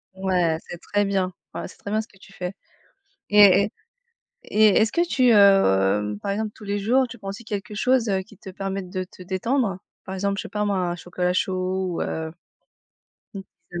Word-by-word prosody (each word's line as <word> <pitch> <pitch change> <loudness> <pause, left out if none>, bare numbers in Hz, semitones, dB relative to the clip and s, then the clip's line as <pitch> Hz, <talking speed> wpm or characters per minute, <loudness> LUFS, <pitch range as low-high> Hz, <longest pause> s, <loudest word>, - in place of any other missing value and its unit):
Ouais, 180 -4 +1
c'est 175 - -7
très 205 +3 0
bien, 190 -2 0 0.2
voilà - - -5
c'est - - -15
très 200 - -7
bien, 215 +1 +1
ce 220 - -12
que 190 - -23
tu 195 +1 -17
fais. 180 0 -5 0.8
Et 200 -1 +7
et 210 - -3 0.7
Et 215 +1 +4
est-ce 220 +1 +2
que 345 +1 +2
tu, 255 -7 +3
heu, 105 - +4
par 200 - -2
exemple 215 +1 -2
tous 215 - -13
les 205 0 -2
jours, 250 +6 +2
tu 245 - -10
prends 195 - -8
aussi 210 +4 -7
quelque 210 -1 -5
chose, 250 +1 +2
heu, 190 -1 +1
qui 200 0 -18
te 195 - -9
permette 195 0 -4
de 185 -1 -3
te 185 - -14
détendre? 195 +2 -1 0.3
Par 190 - -6
exemple, 200 +1 -1
je - - -2
sais - - -8
pas 210 0 -2
moi, 200 -2 0
un 175 -1 -1
chocolat 180 +1 -2
chaud 185 -1 -1
ou, - - -1
heu, 160 0 -4 1.4
une 175 - -4
195 Hz, 210 wpm, -24 LUFS, 185-210 Hz, 1.4 s, Et